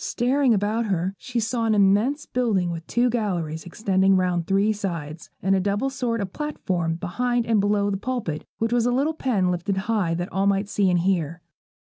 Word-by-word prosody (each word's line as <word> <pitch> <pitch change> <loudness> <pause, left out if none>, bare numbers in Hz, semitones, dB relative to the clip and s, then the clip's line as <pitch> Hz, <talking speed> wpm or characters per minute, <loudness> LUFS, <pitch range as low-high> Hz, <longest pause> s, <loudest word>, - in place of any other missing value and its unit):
Staring 255 +2 +1
about 215 +3 0
her, 185 -1 -1
she 245 -1 -3
saw 230 +1 -1
an 220 -1 +2
immense 210 +9 +3
building 210 -8 0
with 165 -1 -6
two 240 +1 +2
galleries 180 -10 -2
extending 190 +1 +2
round 180 -2 0
three 200 +2 +2
sides, 170 -6 -5
and 190 +1 +3
a - - +2
double 205 +8 0
sort 240 -4 -2
of 190 -2 -5
platform 180 - -2
behind 240 +8 -1
and 225 -2 +2
below 205 0 +1
the 195 - -1
pulpit, 205 -9 -3
which 225 +1 -1
was 240 -1 +2
a - - +2
little 280 +6 +1
pen 215 -12 0
lifted 180 +3 -2
high 190 -4 0
that 175 +2 -4
all 195 +1 +1
might 200 0 +1
see 200 -2 +1
and 175 -1 +2
hear. 170 -3 -1
200 Hz, 195 wpm, -24 LUFS, 180-235 Hz, -, immense